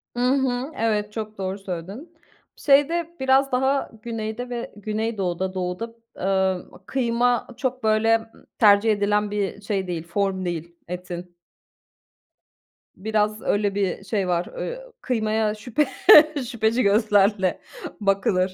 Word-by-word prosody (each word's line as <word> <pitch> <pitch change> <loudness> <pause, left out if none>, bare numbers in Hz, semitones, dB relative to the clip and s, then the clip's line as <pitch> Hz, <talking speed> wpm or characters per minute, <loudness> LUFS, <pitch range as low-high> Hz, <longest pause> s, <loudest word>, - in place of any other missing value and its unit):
Hı - - -4
hı. 265 0 0
Evet, 210 -2 -1
çok 215 -1 -6
doğru 190 0 -3
söyledin. 195 - -7 0.4
Şeyde 325 +4 +2
biraz 265 +1 +3
daha 265 +2 +1
Güney'de 225 +1 -5
ve 240 -1 -5
Güneydoğu'da, 205 -4 -2
Doğu'da, 185 +5 -4 0.2
eee, 190 -1 0 0.2
kıyma 245 0 +1
çok, 255 -1 -3
böyle, 225 +1 +2 0.3
tercih 210 +1 +6
edilen 205 0 +1
bir 205 0 -2
şey 200 -2 -2
değil, 170 -2 -4
form 190 +1 -1
değil, 170 -1 -4
etin. 180 0 -7 1.6
Biraz, 215 +1 0
öyle, 205 -1 0
bir 195 -1 -1
şey 200 -2 -1
var, 175 -1 0
eee, - - -4 0.2
kıymaya 220 -3 0
şüphe 245 +7 0 0.6
şüpheci 230 +2 +1
gözlerle 205 -2 +3 0.4
bakılır. 195 -2 +1
210 Hz, 115 wpm, -23 LUFS, 190-235 Hz, 1.6 s, tercih